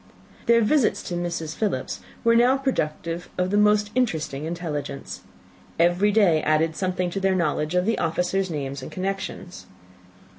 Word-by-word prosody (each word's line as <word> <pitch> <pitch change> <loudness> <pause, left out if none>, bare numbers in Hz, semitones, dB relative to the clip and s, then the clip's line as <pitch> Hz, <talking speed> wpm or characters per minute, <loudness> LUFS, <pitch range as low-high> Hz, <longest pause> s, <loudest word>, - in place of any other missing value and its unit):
Their 235 0 +5
visits 235 +2 +2
to - - -5
Mrs. 170 -3 -3
Philips 215 -2 -2 0.2
were 230 -1 +4
now 245 +3 +5
productive 170 - -2
of 180 +1 0
the - - +1
most 210 0 +3
interesting 160 - -1
intelligence. 150 -5 -5 0.6
Every 175 +5 +3
day 195 -7 +4
added 155 +1 +1
something 185 -1 -1
to 195 - -2
their 195 -1 +2
knowledge 155 -1 0
of 180 0 +2
the 225 +1 +1
officers' 180 +3 0
names 140 -3 -4
and - - -8
connections. 190 -1 -5
180 Hz, 150 wpm, -24 LUFS, 160-205 Hz, 0.6 s, Their